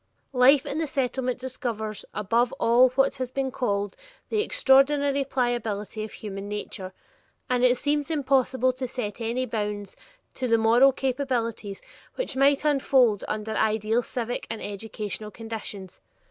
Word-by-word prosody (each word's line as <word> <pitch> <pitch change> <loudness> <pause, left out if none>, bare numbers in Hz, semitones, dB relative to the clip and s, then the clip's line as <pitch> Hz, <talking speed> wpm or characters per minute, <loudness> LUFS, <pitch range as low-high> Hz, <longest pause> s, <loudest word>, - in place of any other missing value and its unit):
Life 265 +2 +5
in 295 - -3
the 320 - -1
Settlement 255 -2 -1
discovers 235 -5 -4
above 230 +4 +1
all 245 +2 +4
what 275 +1 +2
has 255 -1 -3
been 265 0 -2
called 205 -6 -1 0.3
"the 430 - +1
extraordinary 280 - +3
pliability 230 -5 -2
of 215 - -7
human 200 -1 -7
nature," 205 -2 -5 0.6
and 250 0 +2
it 250 0 +5
seems 290 +2 0
impossible 260 -4 +2
to 255 0 -4
set 235 -3 -5
any 235 +3 -1
bounds 210 -4 -4 0.4
to 255 - -3
the 230 -1 +4
moral 235 +5 +5
capabilities 250 -6 -2 0.3
which - - -3
might 275 +2 +3
unfold 260 -7 +3
under 215 +1 -3
ideal 220 +2 +1
civic 245 0 -4
and 225 -1 -4
educational 210 0 -5
conditions. 215 -4 -7
245 Hz, 140 wpm, -26 LUFS, 215-265 Hz, 0.6 s, Life